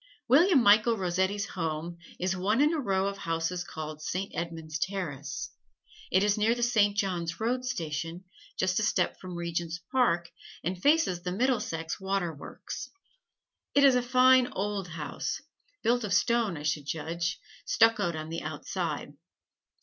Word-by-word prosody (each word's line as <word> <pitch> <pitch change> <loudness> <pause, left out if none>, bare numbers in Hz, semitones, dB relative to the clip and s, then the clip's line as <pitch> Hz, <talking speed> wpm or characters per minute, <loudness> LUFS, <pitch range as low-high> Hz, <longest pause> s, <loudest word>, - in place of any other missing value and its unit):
William 290 +2 +6
Michael 215 +2 +5
Rossetti's 190 +2 0
home 165 -1 -3 0.2
is 185 +1 0
one 200 +6 +1
in 300 +3 +4
a 320 - 0
row 195 -7 +1
of 200 0 -3
houses 165 +1 -2
called 155 -2 -7
Saint 185 +5 -3
Edmund's 165 -2 -4
Terrace. 145 -9 -3 0.6
It 190 +1 +3
is 210 0 +2
near 225 +3 +3
the 240 - -2
Saint 210 -4 +3
John's 170 -4 -1
Road 250 +3 0
Station, 165 -6 -3 0.3
just 185 +1 +1
a - - 0
step 205 -4 +1
from 185 -1 -7
Regent's 170 -1 -3
Park, 175 -11 +2 0.3
and 180 +2 -3
faces 290 - +3
the 180 0 -3
Middlesex 205 -7 -1
Waterworks. 190 -6 -4 0.9
It 285 - +6
is 275 -2 +7
a 250 - +3
fine 255 +1 +5
old 200 -1 -2
house, 155 -4 -4 0.4
built 240 +1 +2
of 205 -2 0
stone 230 -6 +2
I 145 - -7
should 150 -1 -1
judge, 170 +5 -2 0.3
stuccoed 225 - +3
on 155 0 -5
the 165 +1 -4
outside. 155 -1 -4
185 Hz, 150 wpm, -29 LUFS, 165-225 Hz, 0.9 s, is